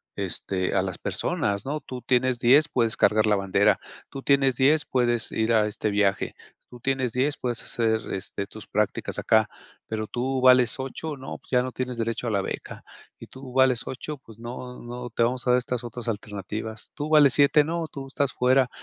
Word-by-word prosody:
este, 95 -1 -2
a - - +4
las - - -4
personas, 100 +2 -1
¿no? 150 +3 -2
"Tú 125 -1 -8
tienes 130 0 +1
10 135 +5 +5
puedes 115 0 +1
cargar 110 0 +3
la 105 - +4
bandera, 100 +2 +2 0.3
tú 135 - -8
tienes 135 -3 +3
10 150 +3 +4
puedes 120 -3 +1
ir 110 +1 +1
a 110 -2 +4
este 105 0 -2
viaje, 100 -1 +1 0.3
tú 125 - -12
tienes 130 -3 -1
10 140 +4 0
puedes 120 -2 -2
hacer, 110 -3 0
este, 100 +1 -3
tus 110 -2 -11
prácticas 105 0 -1
acá, 110 -1 +3 0.4
pero 110 -1 -3
tú 130 +3 -2
vales 125 -2 +6
8 140 +4 -4
no, 135 0 -7
pues, - - -23
ya 125 - +4
no 130 - -4
tienes 125 0 -4
derecho 115 +1 -2
a - - 0
la 100 -2 +1
beca, - - -6 0.4
y - - -11
tú 130 -1 -11
vales 130 -2 +3
8 145 +3 -5
pues, 115 -5 -16
no, 125 +1 -8
no, 120 +1 -7
te 115 - 0
vamos 125 +1 -1
a - - +5
dar 125 - +5
estas 125 0 -3
otras 120 +1 -7
alternativas, 105 +1 -5
tú 145 - -3
vales 150 -3 +6
7 145 +1 +5
no, 165 +1 -2
tú 135 -3 -8
estás 135 0 -1
fuera". 130 0 +3
125 Hz, 200 wpm, -25 LUFS, 110-130 Hz, 0.4 s, vales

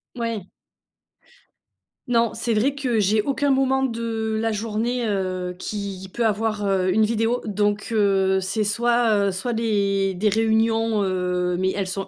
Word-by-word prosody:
Ouais. 230 -5 -3 1.6
Non, 230 -2 +2
c'est 230 0 -2
vrai 250 +7 +2
que 255 -6 -1
j'ai 210 +2 +2
aucun 280 +3 0
moment 265 0 +2
de 225 -2 -2
la 225 -1 0
journée, 230 +3 -2
heu, 185 -3 -2
qui 195 -2 -5
peut 235 -1 0
avoir, 215 -1 0
heu, 190 -1 +1
une 220 +1 +3
vidéo. 225 +2 0
Donc, 205 +1 -1
heu, 195 -3 +2
c'est 195 +3 -1
soit, 225 -1 +2
heu, - - +1
soit 240 +6 -3
les 200 -4 0
des 210 +4 +1
réunions, 225 0 +1
heu, 180 -1 -1
mais 190 0 +1
elles 200 -2 -1
sont 195 +1 -4
215 Hz, 155 wpm, -23 LUFS, 195-230 Hz, 1.6 s, une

